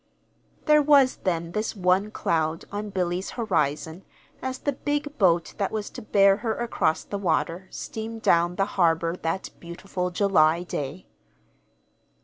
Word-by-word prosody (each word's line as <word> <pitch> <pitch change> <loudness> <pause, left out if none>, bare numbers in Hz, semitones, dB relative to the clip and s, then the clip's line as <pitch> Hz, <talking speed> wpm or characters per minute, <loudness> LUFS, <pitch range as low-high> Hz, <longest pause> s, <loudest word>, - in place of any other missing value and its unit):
There 300 -1 +6
was, 280 -3 +5
then, 170 -2 -2
this 215 +4 -2
one 190 +2 +2
cloud 160 -5 -1
on 205 +1 -4
Billy's 180 -1 -2
horizon 160 - -1 0.4
as 260 0 -3
the 285 - -1
big 290 +2 -3
boat 175 -4 +3
that 195 - 0
was 215 -2 -4
to - - -8
bear 200 -2 +4
her 225 0 -2
across 230 -9 0
the 200 - -5
water 175 0 -1
steamed 225 0 -6
down 170 +1 +3
the 195 - +1
harbor 165 -3 +1
that 165 +3 -3
beautiful 180 +1 -4
July 175 -3 +3
day. 150 0 -5
190 Hz, 140 wpm, -25 LUFS, 170-215 Hz, 0.4 s, There